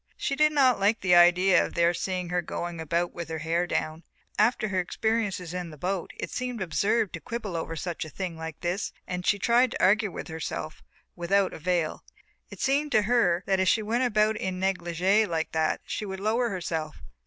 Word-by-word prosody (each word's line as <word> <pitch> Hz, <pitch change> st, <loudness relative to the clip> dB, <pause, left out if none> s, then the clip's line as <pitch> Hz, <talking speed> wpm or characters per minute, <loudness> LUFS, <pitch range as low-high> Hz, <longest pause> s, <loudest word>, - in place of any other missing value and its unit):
She 275 Hz, -, -1 dB
did 305 Hz, +1 st, +4 dB
not 265 Hz, -6 st, +4 dB
like 205 Hz, +3 st, +2 dB
the 180 Hz, -2 st, +3 dB
idea 175 Hz, +1 st, +6 dB
of -, -, -6 dB
their 170 Hz, 0 st, +3 dB
seeing 180 Hz, 0 st, -3 dB
her 180 Hz, 0 st, 0 dB
going 175 Hz, 0 st, -5 dB
about 170 Hz, +2 st, -1 dB
with 170 Hz, -2 st, -6 dB
her 160 Hz, -, -3 dB
hair 165 Hz, +3 st, 0 dB
down; 155 Hz, -1 st, -2 dB, 0.4 s
after 215 Hz, 0 st, +2 dB
her 190 Hz, -2 st, 0 dB
experiences 195 Hz, -2 st, -1 dB
in 180 Hz, -2 st, -4 dB
the 155 Hz, -, -11 dB
boat 180 Hz, +3 st, -2 dB
it -, -, -5 dB
seemed 250 Hz, -2 st, -3 dB
absurd 200 Hz, +3 st, 0 dB
to 170 Hz, -, -5 dB
quibble 215 Hz, -2 st, -5 dB
over 165 Hz, 0 st, -3 dB
a -, -, -6 dB, 0.3 s
thing 180 Hz, +1 st, -5 dB
like 160 Hz, -2 st, -7 dB
this 180 Hz, +4 st, -2 dB
and 180 Hz, -1 st, -4 dB
she 205 Hz, -, +4 dB
tried 240 Hz, +5 st, +3 dB
to -, -, -4 dB
argue 205 Hz, +2 st, +4 dB
with -, -, -7 dB
herself 160 Hz, -1 st, -5 dB, 0.3 s
without 190 Hz, +3 st, +1 dB
avail. 170 Hz, -1 st, -1 dB, 0.5 s
It -, -, -11 dB
seemed 285 Hz, +2 st, +1 dB
to 215 Hz, -2 st, +4 dB
her 195 Hz, -6 st, +2 dB
that 190 Hz, -1 st, +1 dB
if 190 Hz, -, +2 dB
she 220 Hz, -, +2 dB
went 235 Hz, +4 st, 0 dB
about 215 Hz, -2 st, +2 dB
in 185 Hz, -2 st, -3 dB
negligé 190 Hz, +2 st, +1 dB
like 160 Hz, -2 st, -2 dB
that 160 Hz, -1 st, 0 dB
she 210 Hz, -, -4 dB
would 190 Hz, 0 st, -5 dB
lower 230 Hz, +4 st, +1 dB
herself. 165 Hz, -5 st, -4 dB
185 Hz, 200 wpm, -27 LUFS, 170-215 Hz, 0.5 s, idea